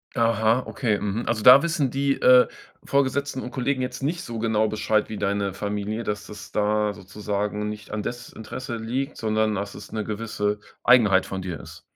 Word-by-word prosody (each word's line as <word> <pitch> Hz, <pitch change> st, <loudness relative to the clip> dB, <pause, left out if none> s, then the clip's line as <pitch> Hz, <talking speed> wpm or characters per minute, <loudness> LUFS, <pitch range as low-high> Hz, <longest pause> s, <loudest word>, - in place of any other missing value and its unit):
Aha, 115 Hz, +1 st, +2 dB
okay, 110 Hz, -6 st, 0 dB
mhm, 105 Hz, +3 st, -2 dB
also 110 Hz, -2 st, 0 dB
da 130 Hz, +3 st, +10 dB
wissen 155 Hz, -6 st, 0 dB
die, 140 Hz, 0 st, +1 dB
äh, 125 Hz, 0 st, +7 dB, 0.4 s
Vorgesetzten 140 Hz, 0 st, 0 dB
und 125 Hz, -, -6 dB
Kollegen 130 Hz, 0 st, -1 dB
jetzt 125 Hz, +1 st, -5 dB
nicht 165 Hz, +5 st, -2 dB
so 115 Hz, -2 st, -6 dB
genau 110 Hz, -1 st, +2 dB
Bescheid 110 Hz, 0 st, 0 dB
wie 110 Hz, -, -6 dB
deine 100 Hz, -1 st, -1 dB
Familie 105 Hz, +3 st, -3 dB
dass 105 Hz, -2 st, -6 dB
da 105 Hz, 0 st, +1 dB
sozusagen 105 Hz, +1 st, -3 dB
nicht 105 Hz, 0 st, -8 dB
an 105 Hz, 0 st, -2 dB
Desinteresse 120 Hz, 0 st, -6 dB
liegt, 130 Hz, +6 st, -3 dB
sondern 110 Hz, -1 st, +1 dB
dass 100 Hz, 0 st, -4 dB
es -, -, -10 dB
'ne 110 Hz, -1 st, -2 dB
gewisse 105 Hz, -1 st, -2 dB, 0.2 s
Eigenheit 105 Hz, -6 st, +5 dB
von 95 Hz, -1 st, -5 dB
dir 90 Hz, -6 st, -5 dB
ist? -, -, -12 dB
110 Hz, 175 wpm, -24 LUFS, 105-125 Hz, 0.4 s, da